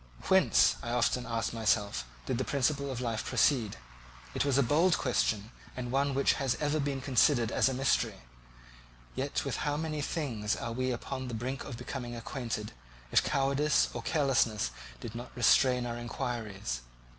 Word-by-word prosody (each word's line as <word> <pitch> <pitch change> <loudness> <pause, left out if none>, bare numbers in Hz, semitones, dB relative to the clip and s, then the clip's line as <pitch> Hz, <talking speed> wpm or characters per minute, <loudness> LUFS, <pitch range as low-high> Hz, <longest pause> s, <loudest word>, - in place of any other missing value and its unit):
Whence, - - +5
I 120 - -5
often 120 0 +1
asked 115 -1 -1
myself, 105 - +1 0.2
did 115 - -1
the - - +1
principle 140 +1 0
of 125 -1 -4
life 115 -3 -2
proceed? 115 - +2 0.6
It - - +1
was 140 -2 +2
a 140 - +5
bold 160 +8 +3
question, 110 -4 0 0.3
and 125 -1 -4
one 140 +1 +1
which 140 - +4
has 135 -2 +1
ever 150 +1 0
been 140 -2 -1
considered 125 -3 +3
as - - +3
a - - -2
mystery; 135 0 +1 1.0
yet - - -2
with - - -2
how 145 0 -1
many 155 -1 -2
things 120 -9 -2
are 115 - -4
we 130 +2 -1
upon 130 +1 -4
the 120 - -4
brink 130 +4 -3
of 120 -4 -6
becoming 125 0 -5
acquainted, 115 -2 -4 0.4
if - - +5
cowardice 140 +2 +2
or - - -4
carelessness 125 - +1 0.3
did 105 - -7
not 120 +1 -7
restrain 125 +1 +4
our 120 0 -3
inquiries. 110 - -4
125 Hz, 170 wpm, -31 LUFS, 115-140 Hz, 1.0 s, Whence